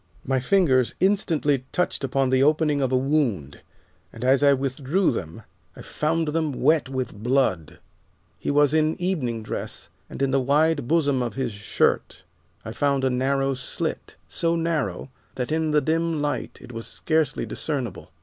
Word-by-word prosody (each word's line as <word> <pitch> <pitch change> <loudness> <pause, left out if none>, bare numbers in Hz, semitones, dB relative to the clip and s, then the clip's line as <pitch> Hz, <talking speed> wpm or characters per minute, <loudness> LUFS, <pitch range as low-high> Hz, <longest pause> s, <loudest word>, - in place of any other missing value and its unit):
My 135 0 +1
fingers 130 -4 +2
instantly 165 -8 +2
touched 180 -5 -1
upon 135 0 0
the 130 0 +3
opening 150 0 +2
of 130 -1 0
a 130 - +3
wound, 125 - -1 0.5
and 115 +2 -7
as 135 +2 +4
I 145 -1 +6
withdrew 140 +6 +1
them 95 -2 -6 0.3
I - - -11
found 160 +1 -1
them 155 -1 -1
wet 145 +2 +2
with 130 -1 -3
blood. 110 - 0 0.6
He - - -3
was 145 0 +3
in 155 0 +2
evening 135 -12 -2
dress, - - -5 0.2
and - - -4
in 135 - +1
the 135 0 +2
wide 145 0 +2
bosom 145 -4 +2
of 120 -4 -3
his 130 -3 -2
shirt 105 0 -1 0.4
I 110 - -5
found 140 +3 0
a 130 - +2
narrow 135 +2 +1
slit, 125 -1 -4
so 170 0 0
narrow 165 -5 -2 0.2
that 125 +2 -3
in 160 0 +1
the 150 -1 +3
dim 165 0 0
light 145 0 -3
it - - -12
was 115 -1 -7
scarcely 160 -2 -1
discernable. 140 -6 -4
140 Hz, 165 wpm, -24 LUFS, 130-155 Hz, 0.6 s, I